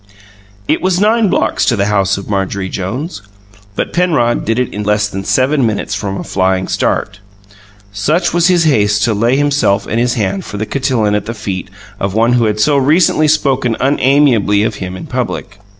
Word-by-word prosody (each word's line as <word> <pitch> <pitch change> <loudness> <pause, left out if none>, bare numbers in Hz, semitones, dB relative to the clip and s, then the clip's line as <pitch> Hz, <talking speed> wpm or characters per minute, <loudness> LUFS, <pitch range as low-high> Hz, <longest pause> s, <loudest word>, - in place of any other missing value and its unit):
It - - +1
was 185 -1 +1
nine 215 +1 +3
blocks - - 0
to 120 - +2
the 100 -2 0
house 100 -2 +1
of 100 - -8
Marjorie 95 -1 -2
Jones; 105 - -5 0.5
but - - -3
Penrod 155 -10 +1
did 115 +2 0
it 125 -1 -1
in 105 - -4
less 105 0 +1
than 95 -1 -6
seven 135 +6 +1
minutes 110 -3 -1
from 100 -1 -3
a - - -5
flying 95 0 0
start 100 0 -1 0.7
such 150 - 0
was 175 0 +3
his 180 -2 +3
haste 105 -9 +2
to 115 - +2
lay 115 +5 +1
himself 140 -8 +1
and 115 - -2
his 120 +1 +1
hand 100 -4 -2
for 105 - -7
the 110 - -2
cotillon 125 -5 0
at 105 0 -2
the 115 - -4
feet 95 -3 -5 0.3
of 100 0 -2
one 115 +2 +3
who 120 -2 +2
had 105 -1 -1
so 140 +7 +3
recently 155 +3 +3
spoken 135 -6 +1
unamiably 130 -6 +2
of 110 - -1
him 95 0 -5
in - - -8
public. 100 0 -4
115 Hz, 195 wpm, -14 LUFS, 100-140 Hz, 0.7 s, nine